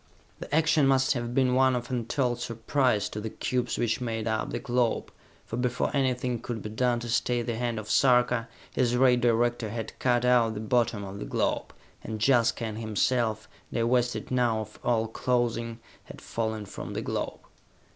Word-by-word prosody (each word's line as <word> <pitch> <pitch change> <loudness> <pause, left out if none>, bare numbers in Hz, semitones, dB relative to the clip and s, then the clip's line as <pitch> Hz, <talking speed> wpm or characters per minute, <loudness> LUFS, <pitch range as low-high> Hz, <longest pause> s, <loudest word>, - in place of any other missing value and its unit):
The - - -3
action 155 -2 +4
must 130 -1 +3
have 120 -1 -4
been 130 -2 +3
one 130 0 +4
of 120 +1 -4
untold 120 0 -1
surprise 115 -1 0
to 105 - -5
the 110 - -4
cubes 125 +2 -2
which 115 +1 0
made 115 -2 -2
up 110 0 -1
the - - -3
globe, 120 -2 0 0.3
for 115 - -5
before 125 +3 -1
anything 125 -3 0
could 115 -3 -5
be 105 - -5
done 120 +1 +1
to 120 - -5
stay 120 +1 +1
the 115 0 -2
hand 120 -1 -2
of 110 -1 -5
Sarka, 125 -2 +3 0.2
his 125 -1 +1
ray 125 -1 +5
director 120 -1 +1
had 110 0 -6
cut 125 -1 +2
out 120 -3 +4
the - - -4
bottom 115 -1 +1
of 100 +1 -7
the - - -5
globe, - - -1 0.3
and 110 -1 -5
Jaska 120 -3 +3
and 110 0 -5
himself, 110 +1 0 0.2
divested 120 +2 0
now 120 -3 +2
of 110 0 -10
all 115 -2 +1
clothing, 115 0 -1 0.3
had - - -11
fallen 110 -2 -3
from - - -7
the - - -3
globe. - - -3
120 Hz, 180 wpm, -28 LUFS, 115-125 Hz, 0.3 s, ray